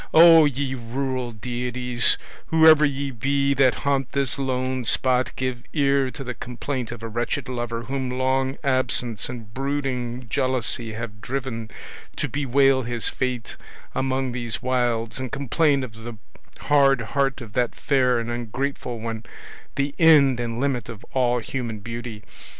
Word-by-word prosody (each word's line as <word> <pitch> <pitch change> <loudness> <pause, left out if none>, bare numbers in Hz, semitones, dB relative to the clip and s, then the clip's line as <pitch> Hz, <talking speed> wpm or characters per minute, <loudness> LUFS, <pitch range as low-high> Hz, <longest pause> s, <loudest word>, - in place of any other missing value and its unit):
Oh, 165 -1 +9
ye 140 -1 -1
rural 130 0 -3
deities, 125 +1 0 0.3
whoever 160 -1 +6
ye 140 -1 0
be 140 +3 +1
that 135 -2 +4
haunt 135 -2 0
this 140 -1 0
lone 130 -1 -1
spot, 130 +2 +1
give 130 -2 -3
ear 140 -2 +2
to 135 - -8
the 125 -1 -4
complaint 125 0 -5
of 120 -1 -8
a - - -3
wretched 120 +5 -2
lover 120 -2 -3
whom 130 0 -3
long 130 +1 0
absence 125 -5 0
and 115 -4 -8
brooding 130 -3 -3
jealousy 120 -1 0
have 105 -1 -7
driven 125 -3 -4 0.5
to - - -2
bewail 135 -1 +3
his 120 -1 +2
fate 125 -3 -3 0.4
among 130 -1 -1
these 120 -2 -2
wilds 120 -2 0
and 130 -2 -4
complain 140 +1 +1
of 120 -4 -7
the 115 0 -9 0.4
hard 135 -3 +4
heart 135 +4 0
of 115 -5 -10
that 125 -2 0
fair 130 -4 +2
and 115 0 -3
ungrateful 120 +1 -3
one, 115 0 -5 0.5
the 140 0 -1
end 145 -6 +6
and 115 -1 -3
limit 130 -4 -1
of 115 -4 -9
all 125 -2 +2
human 120 -1 -4
beauty! 115 0 -7
130 Hz, 150 wpm, -24 LUFS, 120-135 Hz, 0.5 s, Oh